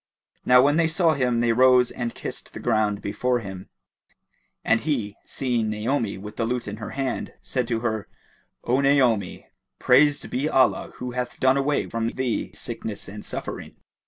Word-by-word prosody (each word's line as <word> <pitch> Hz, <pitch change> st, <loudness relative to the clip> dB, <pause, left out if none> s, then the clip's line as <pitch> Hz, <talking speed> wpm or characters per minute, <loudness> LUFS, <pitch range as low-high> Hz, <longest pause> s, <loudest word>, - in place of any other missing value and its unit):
Now 125 Hz, 0 st, +7 dB
when 145 Hz, +2 st, +3 dB
they 165 Hz, -1 st, +3 dB
saw 165 Hz, 0 st, +3 dB
him, 125 Hz, -4 st, +1 dB
they 120 Hz, -1 st, +3 dB
rose 125 Hz, 0 st, +5 dB
and 120 Hz, -2 st, -4 dB
kissed -, -, -7 dB
the -, -, -7 dB
ground 110 Hz, -3 st, 0 dB
before 125 Hz, +5 st, 0 dB
him; 95 Hz, -4 st, -8 dB, 1.0 s
and 115 Hz, -, +3 dB
he, 120 Hz, -10 st, -2 dB
seeing 120 Hz, -4 st, -1 dB
Naomi 110 Hz, 0 st, -1 dB
with 105 Hz, +2 st, -9 dB
the 115 Hz, -, 0 dB
lute 120 Hz, 0 st, -2 dB
in 100 Hz, +1 st, -5 dB
her 110 Hz, -1 st, -6 dB
hand, 135 Hz, -2 st, -3 dB
said 125 Hz, -3 st, -1 dB
to 115 Hz, -2 st, -1 dB
her, 110 Hz, -3 st, -2 dB, 0.6 s
"O 130 Hz, +3 st, +2 dB
Naomi, 130 Hz, -7 st, +2 dB, 0.3 s
praised 145 Hz, +3 st, +4 dB
be 135 Hz, +5 st, 0 dB
Allah 130 Hz, -4 st, +2 dB
who 125 Hz, 0 st, -5 dB
hath 125 Hz, 0 st, -4 dB
done 130 Hz, 0 st, +4 dB
away 140 Hz, +1 st, 0 dB
from 115 Hz, 0 st, -2 dB
thee 125 Hz, -1 st, -2 dB
sickness 105 Hz, -3 st, -5 dB
and 105 Hz, +1 st, -8 dB
suffering!" -, -, -6 dB
125 Hz, 170 wpm, -24 LUFS, 110-130 Hz, 1.0 s, Now